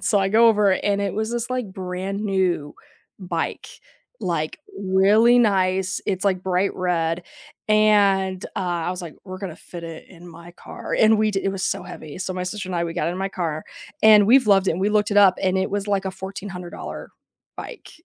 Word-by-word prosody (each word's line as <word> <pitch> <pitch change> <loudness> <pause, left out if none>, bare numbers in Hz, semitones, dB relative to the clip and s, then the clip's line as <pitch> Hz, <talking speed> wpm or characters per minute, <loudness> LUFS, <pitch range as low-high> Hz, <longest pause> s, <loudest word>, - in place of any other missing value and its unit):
and - - -8
so, 205 - +3
I 195 0 +1
go 230 +3 +5
over 210 -3 +4
and 200 +1 0
it 200 -1 -2
was 220 +1 -2
this 240 +1 -2
like 250 -7 -3
brand 190 +2 -4
new 185 -7 0 0.5
bike, 175 -3 -4 0.5
like, - - -2 0.2
really 205 +5 +4
nice, 190 -4 +1
it's 195 0 -1
like 185 -2 +1
bright 190 +1 0
red 175 -2 -1 0.5
and, 200 -3 +3
uh, - - 0 0.3
I - - 0
was 180 0 -5
like, 165 -3 -8
"We're 185 -1 -8
gonna 185 -5 -6
fit 170 -1 -10
it 165 -1 -9
in 175 -1 -14
my 170 +1 -13
car." - - -7
And 220 0 +5
we 215 0 +2
di 195 - -1
it 195 - 0
was 190 -1 -3
so - - -1
heavy, 175 -4 -9
so, 185 0 -3
my 180 - -3
sister 195 +1 -5
and 180 - -3
I, 170 - 0
we 165 -1 -5
got 165 -2 -1
it 175 - -2
in 180 - -6
my 195 0 -1
car 165 -5 -4 0.4
and 210 -2 +7
we've 255 +1 +5
loved 195 -2 +4
it - - +3
and 175 - -4
we 200 - +2
looked 210 0 +1
it 205 - 0
up 195 -2 +6
and 190 0 +1
it 190 - -1
was 205 0 -2
like 200 -1 0
a - - -1
$1,400 190 -1 -8 0.5
bike - - -9
190 Hz, 220 wpm, -22 LUFS, 180-205 Hz, 0.5 s, and